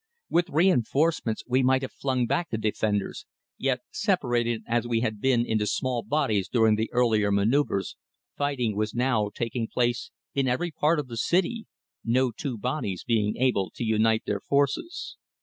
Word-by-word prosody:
With 175 Hz, +1 st, +2 dB
reinforcements 155 Hz, -, +2 dB
we 130 Hz, +1 st, +2 dB
might 130 Hz, +1 st, +3 dB
have 130 Hz, -, -4 dB
flung 130 Hz, -3 st, -1 dB
back 145 Hz, +6 st, -1 dB
the 110 Hz, -, -2 dB
defenders, 105 Hz, -2 st, -1 dB, 0.3 s
yet 130 Hz, -2 st, 0 dB
separated 120 Hz, -, 0 dB
as 120 Hz, 0 st, 0 dB
we 115 Hz, -1 st, +1 dB
had 110 Hz, -3 st, -2 dB
been 125 Hz, -3 st, +3 dB
into 110 Hz, -2 st, 0 dB
small 125 Hz, +3 st, -1 dB
bodies 110 Hz, -11 st, 0 dB
during 110 Hz, -3 st, +4 dB
the 110 Hz, +1 st, -1 dB
earlier 110 Hz, -4 st, +2 dB
manoeuvres, 100 Hz, -1 st, +1 dB, 0.4 s
fighting 130 Hz, -7 st, -1 dB
was 105 Hz, +1 st, -2 dB
now 120 Hz, -4 st, +1 dB
taking 115 Hz, 0 st, -3 dB
place 120 Hz, 0 st, -1 dB, 0.2 s
in 135 Hz, -1 st, +1 dB
every 145 Hz, +8 st, 0 dB
part 155 Hz, +2 st, +2 dB
of 145 Hz, -3 st, -3 dB
the 115 Hz, -2 st, -7 dB
city, 190 Hz, -, 0 dB, 0.4 s
no 125 Hz, +2 st, +2 dB
two 125 Hz, +1 st, -5 dB
bodies 105 Hz, -, -3 dB
being 105 Hz, -3 st, 0 dB
able 120 Hz, -7 st, +1 dB
to -, -, -4 dB
unite 110 Hz, 0 st, +2 dB
their 100 Hz, -1 st, -2 dB
forces. 145 Hz, -, -1 dB
120 Hz, 165 wpm, -26 LUFS, 110-140 Hz, 0.4 s, during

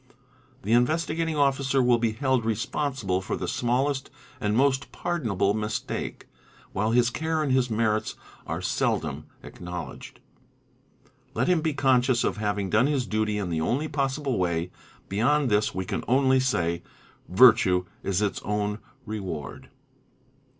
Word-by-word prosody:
The 105 Hz, -, -3 dB
Investigating 160 Hz, +5 st, +1 dB
Officer 140 Hz, -1 st, +2 dB
will 120 Hz, -2 st, +4 dB
be 115 Hz, -1 st, 0 dB
held 130 Hz, 0 st, +1 dB
responsible 115 Hz, -2 st, -1 dB
for 95 Hz, -, -3 dB
the -, -, -4 dB
smallest 130 Hz, +3 st, 0 dB, 0.3 s
and 105 Hz, +1 st, 0 dB
most 135 Hz, 0 st, +2 dB
pardonable 110 Hz, -, 0 dB
mistake, 110 Hz, 0 st, -4 dB, 0.5 s
while 105 Hz, +3 st, 0 dB
his 120 Hz, +1 st, +3 dB
care 160 Hz, +3 st, -1 dB
and 140 Hz, -, -1 dB
his 130 Hz, -1 st, +2 dB
merits 110 Hz, -1 st, 0 dB, 0.3 s
are -, -, -3 dB
seldom -, -, -1 dB, 0.2 s
acknowledged. 90 Hz, -6 st, -8 dB, 1.2 s
Let -, -, +1 dB
him 180 Hz, -3 st, +3 dB
be 155 Hz, -2 st, -1 dB
conscious 130 Hz, -3 st, +3 dB
of -, -, -1 dB
having 105 Hz, -2 st, -2 dB
done 115 Hz, +5 st, +4 dB
his 140 Hz, -4 st, 0 dB
duty 110 Hz, -1 st, -1 dB
in 105 Hz, -, -2 dB
_ -, -, -4 dB
the 80 Hz, -1 st, -1 dB
only 135 Hz, -, 0 dB
possible 135 Hz, -4 st, -1 dB
way. 85 Hz, -1 st, -1 dB, 0.4 s
Beyond 125 Hz, +6 st, +1 dB
this 105 Hz, +1 st, +1 dB
we 95 Hz, 0 st, -2 dB
can -, -, -3 dB
only 130 Hz, +1 st, +4 dB
say, 85 Hz, -10 st, 0 dB, 0.2 s
" -, -, -29 dB
Virtue 95 Hz, -4 st, +5 dB, 0.2 s
is 100 Hz, +1 st, 0 dB
its 100 Hz, -, -1 dB
own 105 Hz, 0 st, -2 dB
— 135 Hz, -1 st, -33 dB
reward." 95 Hz, -9 st, -6 dB
120 Hz, 150 wpm, -26 LUFS, 105-135 Hz, 1.2 s, Virtue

